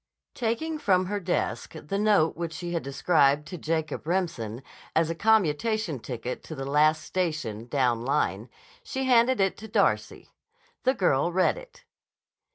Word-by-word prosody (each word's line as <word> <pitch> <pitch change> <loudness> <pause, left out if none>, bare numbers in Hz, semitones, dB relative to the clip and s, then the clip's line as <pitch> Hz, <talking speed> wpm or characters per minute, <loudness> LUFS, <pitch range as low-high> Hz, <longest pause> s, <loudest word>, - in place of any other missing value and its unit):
Taking 285 +7 -2
from 185 -9 +2
her 205 +2 -2
desk 180 -2 -2
the 160 +5 -4
note 205 -7 +3
which 165 -1 -4
she 170 +3 -5
had 170 - 0
described 140 +1 +2
to 180 - -6
Jacob 160 -1 -2
Remsen 150 - -2 0.3
as 165 0 +2
a - - -1
commutation 215 - +1
ticket 120 +1 -5
to 160 - -7
the 135 -1 -5
last 150 +3 +3
station, 155 - -3
down 125 -3 +1
line, 120 -5 0 0.3
she 265 - -4
handed 250 -1 +4
it 195 -1 +1
to 220 - -9
Darcy. 215 - 0 0.5
The 260 - +3
girl 170 - +2
read 185 +1 +2
it. - - -13
165 Hz, 155 wpm, -27 LUFS, 140-205 Hz, 0.5 s, handed